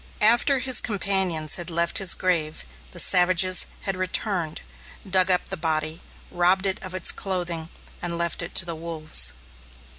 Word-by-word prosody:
After 240 +6 +3
his 260 0 +2
companions 190 -7 +1
had 175 -1 -4
left 170 0 -1
his 195 -3 +4
grave, 165 - -2 0.2
the - - -9
savages 185 0 +4
had 195 - -2
returned, 185 -3 -2 0.5
dug 185 0 +1
up 180 -1 0
the 195 - -1
body, 155 0 -2 0.3
robbed 180 +2 +1
it 190 -1 0
of 185 0 -7
its 185 - +2
clothing, 175 -4 -4 0.3
and 170 -1 -3
left 170 0 -2
it 170 - -7
to 170 - +2
the 170 - -4
wolves. 155 - 0
180 Hz, 155 wpm, -23 LUFS, 165-190 Hz, 0.5 s, his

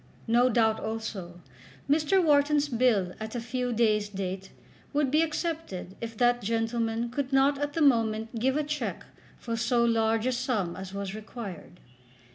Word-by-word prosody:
No 240 +2 +4
doubt, 220 -2 +2
also, 200 -6 -5 0.5
Mr. 310 +6 +3
Wharton's 295 -1 +3
bill 225 -7 +2
at 220 +2 -6
a - - -1
few 245 +1 -2
days' 215 -3 +2
date 190 -1 -5 0.4
would 285 -2 +1
be 305 +2 +4
accepted 320 - -3
if 230 -1 -6
that 245 0 +3
gentleman 225 +1 -1
could 270 +1 -3
not 270 +1 +3
at 290 0 -2
the 325 - +1
moment 225 -3 +2
give 265 +4 +1
a 305 - +1
cheque 300 +1 -3 0.3
for 230 -1 -4
so 235 +1 +2
large 225 -1 +2
a 255 - +2
sum 240 -9 -1
as 190 0 -7
was 200 -1 -4
required. 210 -5 -8
235 Hz, 160 wpm, -28 LUFS, 215-270 Hz, 0.5 s, No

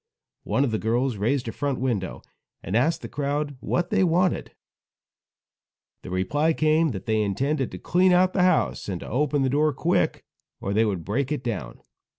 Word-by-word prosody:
One 135 - +1
of 135 - 0
the 110 - -1
girls 120 +2 0
raised 120 +5 0
a - - -2
front 140 +3 -2
window 115 -8 -2 0.4
and 95 - -3
asked 155 +8 +2
the - - -4
crowd 145 0 -2
what 175 +6 -1
they - - +3
wanted. 180 +1 +1 1.5
The - - -9
reply 145 - +1
came 155 +1 +2
that 100 -8 -6
they 110 -1 +1
intended 135 +8 0
to - - -7
clean 185 +1 +3
out 180 +1 +4
the 190 - +2
house, 180 - +1
and 90 -3 -3
to - - -8
open 145 +3 +1
the - - +2
door 150 +4 +2
quick, 165 +7 0 0.3
or 100 - -3
they 110 +2 +3
would 95 -6 -2
break 135 +7 -1
it 145 -4 -2
down. 115 -6 -4
135 Hz, 185 wpm, -25 LUFS, 110-155 Hz, 1.5 s, out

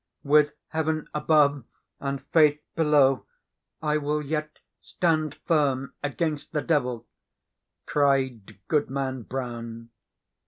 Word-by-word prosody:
"With 150 +1 +4 0.2
heaven 160 -1 -1
above 150 -3 +3 0.4
and 140 0 -3
Faith 150 -1 +3
below, 145 -5 +3 0.6
I 150 0 +2
will 150 0 -1
yet 155 +1 -3 0.2
stand 155 -4 0
firm 140 -5 +1
against 150 +1 -2
the 150 - 0
devil!" 125 -7 0 0.8
cried 130 -7 +1
Goodman 135 -3 -1
Brown. 115 -2 -6
145 Hz, 95 wpm, -26 LUFS, 130-150 Hz, 0.8 s, With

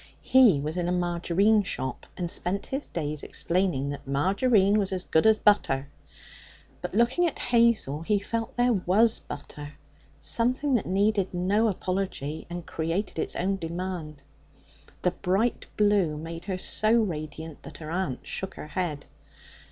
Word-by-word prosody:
He 245 - +6
was 155 +4 -3
in 175 -1 -1
a - - 0
margarine 180 +4 +2
shop, 130 -9 -4
and 175 -2 -2
spent 195 +3 +1
his 270 +2 -4
days 150 -3 -4
explaining 170 -6 0
that 145 -1 -7
Margarine 195 - +3
was 195 -2 -1
as 185 -1 -3
good 160 +4 +3
as 220 -1 +6
butter. 140 -11 +2 0.9
But, - - -5
looking 245 +10 +3
at 320 - -4
Hazel, 230 - +2
he 205 +5 +1
felt 225 +3 -3
that 245 - +3
here 240 -6 +2
was 220 +5 +4
butter 145 0 -9 0.4
something 255 +4 +1
that 240 - +1
needed 195 0 +1
no 200 +5 +2
apology, 185 -6 -3
and 175 -1 -6
created 165 +3 -3
its - - -2
own 195 +3 0
demand. 170 -4 -5 0.8
The 180 - +3
bright 195 +8 0
blue 205 -7 +3
made 165 +2 -7
her 190 -2 -2
so 215 +4 +1
radiant 160 -7 -2
that 140 - -10
her 155 -1 -7
aunt 170 -8 -2
shook 190 - -5
her 150 - -8
head. 155 -3 -3
185 Hz, 155 wpm, -27 LUFS, 160-210 Hz, 0.9 s, He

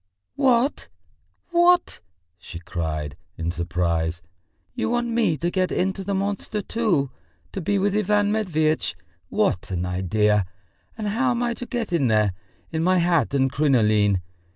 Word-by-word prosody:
"What, 265 -1 +2 0.6
what!" 350 +1 +3 0.4
she 85 0 -9
cried, 80 -4 -4 0.2
in 85 0 -2
surprise. 85 -1 -1 0.5
"You 245 - -2
want 240 0 0
me 230 -9 +1
to 175 +3 -1
get 185 -1 0
into 190 +1 -1
the 200 +1 -2
monster 205 +1 -2
too, 180 - 0 0.4
to 195 - -4
be 200 +4 +1
with 200 +1 +1
Ivan 210 0 +2
Matveitch? 160 - 0 0.3
What 90 - 0
an 90 -1 -2
idea! 95 +2 +1 0.5
And 215 -2 -2
how 245 +5 +1
am 245 0 0
I 240 0 0
to 245 +1 -7
get 235 -7 -3
in 145 -7 +2
there, 105 -3 +2 0.4
in 160 0 -1
my 185 +1 +3
hat 170 -7 +2
and 135 -1 +2
crinoline? 110 -9 +3
170 Hz, 150 wpm, -24 LUFS, -, 0.6 s, what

